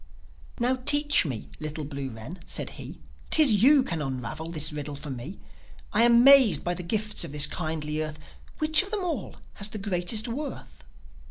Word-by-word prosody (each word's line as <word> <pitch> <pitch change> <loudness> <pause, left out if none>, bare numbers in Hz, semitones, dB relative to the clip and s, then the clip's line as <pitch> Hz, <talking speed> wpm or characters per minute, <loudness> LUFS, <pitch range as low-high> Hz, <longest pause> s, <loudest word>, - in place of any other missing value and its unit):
"Now, 245 +2 +1
teach 290 - +3
me, 125 -6 -6
little 155 0 -5
blue 140 -2 -6
wren," 120 +10 -10
said - - -3
he. - - -10 0.3
"'Tis 255 -11 +6
you 275 +2 +6
can 165 -9 -4
unravel 135 +4 -5
this 155 -2 -2
riddle 150 -1 -6
for 145 0 -8
me. 130 +9 -8 0.6
I 220 - +3
am 235 0 +5
'mazed 275 -6 +6
by 175 - -2
the 180 - -6
gifts 210 +4 -2
of 165 - -8
this 150 0 +4
kindly 155 -2 -4
earth. 155 -1 -5 0.4
Which 310 0 +3
of 390 - -8
them 420 -3 -2
all 315 - -4 0.2
has 200 +1 -1
the 215 - -7
greatest 205 +3 -1
worth?" 230 - -7
175 Hz, 180 wpm, -26 LUFS, 150-245 Hz, 0.6 s, Tis